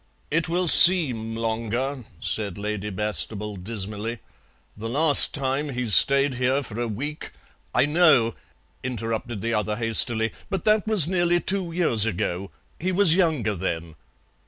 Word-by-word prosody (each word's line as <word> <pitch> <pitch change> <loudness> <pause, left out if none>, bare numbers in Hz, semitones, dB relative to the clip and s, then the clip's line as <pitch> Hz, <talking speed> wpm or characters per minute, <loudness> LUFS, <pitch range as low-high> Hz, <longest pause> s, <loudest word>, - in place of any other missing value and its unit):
"It 165 +2 -1
will 175 +1 -1
seem 130 -12 +6
longer," 115 +3 -4
said 105 -4 -3
Lady 105 0 -5
Bastable 105 +1 -3
dismally. 105 +3 -6 0.6
"The 110 +2 -7
last 145 +4 +4
time 140 +1 -3
he 125 -2 -4
stayed 140 +5 +4
here 130 +3 -1
for 115 -2 -8
a 120 - -2
week 145 +8 -6 0.2
" - - -24
"I - - +3
know," 145 -7 +2 0.5
interrupted 115 -3 -5
the 115 0 -3
other 105 -1 -2
hastily, 115 0 +2 0.2
"but 195 -3 -5
that 215 -1 +1
was 215 -8 +5
nearly 175 -1 0
two 190 -2 -2
years 125 - +2
ago. 95 -1 -4 0.3
He 185 +4 -2
was 185 -3 +4
younger 155 - 0
then." 85 -3 -5
120 Hz, 145 wpm, -23 LUFS, 105-155 Hz, 0.6 s, seem